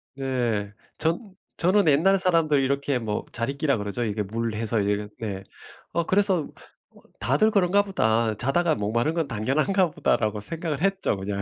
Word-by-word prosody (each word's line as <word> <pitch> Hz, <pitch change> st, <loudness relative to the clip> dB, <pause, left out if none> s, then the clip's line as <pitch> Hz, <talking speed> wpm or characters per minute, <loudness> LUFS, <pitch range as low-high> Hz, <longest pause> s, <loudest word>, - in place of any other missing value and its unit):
네. 120 Hz, -7 st, -2 dB, 0.2 s
저 165 Hz, +1 st, +1 dB, 0.4 s
저는 185 Hz, +1 st, +3 dB
옛날 170 Hz, +7 st, +4 dB
사람들 165 Hz, -6 st, +2 dB
이렇게 140 Hz, -1 st, 0 dB
뭐 105 Hz, -2 st, -3 dB
자리끼라 140 Hz, +3 st, -1 dB
그러죠. 105 Hz, +3 st, -3 dB
이게 105 Hz, -2 st, -1 dB
물 115 Hz, +3 st, -3 dB
해서 110 Hz, 0 st, -1 dB
이거 105 Hz, +1 st, 0 dB
네 100 Hz, -4 st, -4 dB, 0.5 s
어 170 Hz, 0 st, 0 dB
그래서 190 Hz, -4 st, +2 dB, 0.4 s
'어 -, -, -20 dB, 0.2 s
다들 140 Hz, -, +3 dB
그런가 200 Hz, -1 st, +3 dB
보다. 110 Hz, -, +1 dB
자다가 155 Hz, +8 st, +1 dB
목 105 Hz, 0 st, -2 dB
마른 120 Hz, +7 st, +1 dB
건 165 Hz, -3 st, -1 dB
당연한가 155 Hz, -, +1 dB
보다.'라고 110 Hz, -8 st, 0 dB
생각을 160 Hz, +5 st, -3 dB
했죠 195 Hz, -, 0 dB
그냥. 100 Hz, +1 st, -3 dB
135 Hz, 325 characters per minute, -25 LUFS, 110-170 Hz, 0.5 s, 옛날